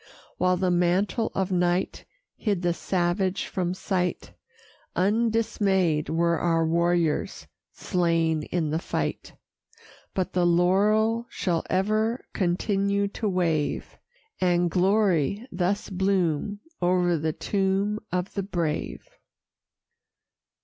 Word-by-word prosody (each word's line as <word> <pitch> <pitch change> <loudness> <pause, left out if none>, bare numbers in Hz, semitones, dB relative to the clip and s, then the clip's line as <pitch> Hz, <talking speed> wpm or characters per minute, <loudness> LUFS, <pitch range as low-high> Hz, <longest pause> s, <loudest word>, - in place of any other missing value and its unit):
While 180 0 +3
the 185 0 +1
mantle 180 +6 +1
of 190 0 -1
night 180 0 0 0.3
Hid 200 -5 -1
the 175 -1 +2
savage 180 +2 -1
from 180 -1 -2
sight, 180 -2 -2 0.6
Undismay'd 200 -6 +1
were 170 +1 +1
our 165 -1 +2
warriors 170 -1 0 0.3
slain 165 -3 0
in 155 0 -2
the 160 - 0
fight: - - -3 0.8
But 185 -2 -1
the 180 - +2
laurel 210 +7 +3
shall 170 -3 -1
ever 215 +5 0
continue 200 +2 0
to 210 +1 -2
wave, 165 -5 -1 0.4
And 175 -2 +2
glory 195 - +2
thus 185 +3 -1
bloom 190 0 0 0.2
o'er 175 -1 +2
the 155 +1 -1
tomb 200 +3 0
of 180 +1 -2
the 200 - -1
brave. 170 -5 -3
180 Hz, 105 wpm, -26 LUFS, 175-200 Hz, 0.8 s, While